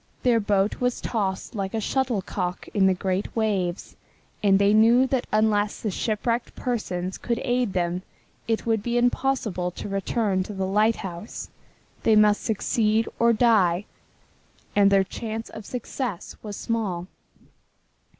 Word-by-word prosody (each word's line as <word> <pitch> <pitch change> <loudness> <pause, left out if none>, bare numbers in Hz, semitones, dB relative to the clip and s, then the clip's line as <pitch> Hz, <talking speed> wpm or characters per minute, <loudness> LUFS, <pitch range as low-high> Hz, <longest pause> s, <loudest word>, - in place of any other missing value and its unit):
Their 240 -2 +4
boat 200 -1 +1
was 250 0 0
tossed 195 -5 -2
like 195 -1 -3
a - - 0
shuttlecock 205 -7 -2
in 195 -2 +4
the 190 - +3
great 190 +1 -2
waves, 200 -6 -1 0.5
and 195 -2 +5
they 200 +1 +4
knew 230 +4 +6
that 260 -1 -1
unless 210 -1 +2
the 215 - -2
shipwrecked 230 +4 -1
persons 185 -7 -3
could 235 -1 -1
aid 245 -4 0
them 175 0 -1 0.5
it 225 -1 0
would 225 -2 +1
be 240 +3 -1
impossible 240 -7 0
to 180 - -7
return 195 0 0
to 200 +3 -5
the 190 0 -1
lighthouse. 205 -1 -1 0.5
They 220 - +4
must 210 -1 +5
succeed 220 0 +1
or 235 0 +5
die, 210 -6 +3 0.9
and 200 -1 +6
their 195 -1 +4
chance 220 +3 -5
of 215 - -9
success 245 -4 -4
was 210 -2 -6
small. 205 -7 -2
210 Hz, 140 wpm, -25 LUFS, 190-230 Hz, 0.9 s, knew